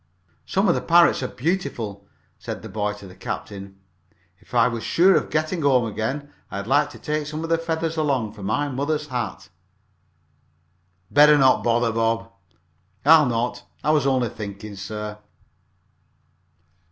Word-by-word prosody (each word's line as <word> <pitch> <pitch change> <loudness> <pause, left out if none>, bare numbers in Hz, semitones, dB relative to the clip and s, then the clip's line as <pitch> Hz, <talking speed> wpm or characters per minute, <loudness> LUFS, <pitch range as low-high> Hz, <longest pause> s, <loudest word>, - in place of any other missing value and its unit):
"Some 195 +2 +1
of 170 - +5
the - - -1
parrots 170 -3 +4
are 130 - -1
beautiful," 120 - -3 0.3
said - - -6
the - - -8
boy 105 +1 -2
to 105 -1 -12
the 90 - -12
captain. 100 -1 -7 0.6
"If - - -12
I 115 - +5
was 115 -2 -3
sure 185 +3 +4
of - - 0
getting 155 +3 -1
home 130 -4 +3
again 130 +7 -4 0.2
I'd 100 -1 -5
like 145 +5 +2
to - - -12
take 150 -1 -3
some 155 +1 -5
of 165 - -4
the 165 - +3
feathers 165 0 -2
along, 135 -8 0
for 105 - -12
my 110 +9 0
mother's 145 +3 -2
hat." 110 -9 -4 1.6
"Better 150 +1 +7
not 130 -2 +4
bother, 120 0 +2
Bob." 115 0 0 0.7
"I'll 155 -1 +7
not. 125 +1 -1 0.2
I 150 - +3
was 150 -3 +2
only 130 -3 +1
thinking, 100 0 -8
sir." 105 +2 -6
125 Hz, 155 wpm, -23 LUFS, 110-150 Hz, 1.6 s, Better